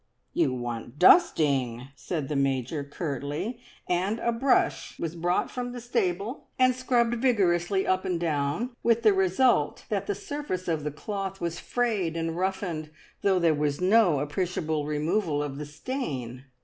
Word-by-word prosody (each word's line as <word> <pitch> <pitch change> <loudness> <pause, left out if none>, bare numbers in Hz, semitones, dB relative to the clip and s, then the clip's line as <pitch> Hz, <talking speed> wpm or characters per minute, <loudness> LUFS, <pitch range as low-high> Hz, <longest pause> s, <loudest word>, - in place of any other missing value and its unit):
"You - - +2
want 120 0 -5
dusting!" 135 - +4
said 150 +2 -4
the 150 - -3
Major 135 +1 0
curtly, 145 - -4 0.3
and 185 +5 0
a 235 - 0
brush 250 +3 +1
was 165 0 -4
brought 175 +2 0
from 245 -1 -4
the 245 - -5
stable, 225 - -2
and 255 -1 +5
scrubbed 245 -2 +1
vigorously 190 -6 +2
up 185 0 +1
and 180 -3 -1
down, 165 - -1
with 230 0 +2
the 215 -2 +6
result 190 - +2
that 200 -2 -1
the 205 - 0
surface 205 -4 -4
of 160 -3 0
the 150 - -1
cloth 195 +5 -5
was 170 0 -3
frayed 210 -9 -1
and 165 0 -2
roughened, 180 -4 -2 0.3
though 195 -2 +3
there 170 -3 +3
was 145 -1 -1
no 185 -5 +4
appreciable 155 -1 -2
removal 150 +1 0
of 140 -1 -5
the 150 - -5
stain. 140 - -5
175 Hz, 155 wpm, -27 LUFS, 150-215 Hz, 0.3 s, the